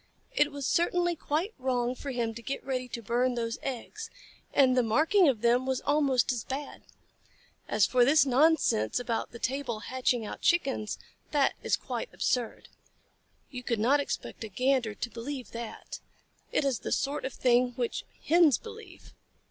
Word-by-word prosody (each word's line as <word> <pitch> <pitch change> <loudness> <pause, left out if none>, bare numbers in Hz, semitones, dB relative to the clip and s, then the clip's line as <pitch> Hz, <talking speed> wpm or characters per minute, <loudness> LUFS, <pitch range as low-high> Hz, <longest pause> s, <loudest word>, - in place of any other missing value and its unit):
It 295 0 +3
was 285 -1 -5
certainly 350 +2 +2
quite 325 +7 -2
wrong 250 -1 0
for 275 +2 -7
him 235 -3 -1
to 235 - -8
get 275 +4 -5
ready 255 -2 -2
to 235 -1 -7
burn 245 +3 +1
those 230 -1 -3
eggs, 350 - -5 0.4
and 260 -2 +4
the 250 - +4
marking 310 - +4
of 235 -6 -1
them 240 +2 +3
was 265 -1 0
almost 280 -4 +2
as 240 -4 -3
bad. 275 +2 -6 0.9
As 205 - +3
for 250 +4 +3
this 280 +3 +5
nonsense 265 - +3
about 240 -2 -2
the 235 - -9
table 245 -3 -2
hatching 250 -2 0
out - - -7
Chickens, 270 -10 +1 0.3
that 285 -2 +2
is - - +1
quite - - -5
absurd. 245 -3 -1 0.8
You 250 -2 -6
could 235 -2 -1
not 260 +7 +4
expect 280 - -4
a - - -4
Gander 250 0 +1
to 240 - -4
believe 250 +3 -6
that. 235 -1 -7 0.5
It - - +1
is 270 -4 +1
the - - -5
sort 280 +2 -1
of 265 - -4
thing 245 0 +3
which 240 -1 -2 0.2
Hens 325 -4 +5
believe." 450 0 -12
255 Hz, 170 wpm, -29 LUFS, 240-285 Hz, 0.9 s, this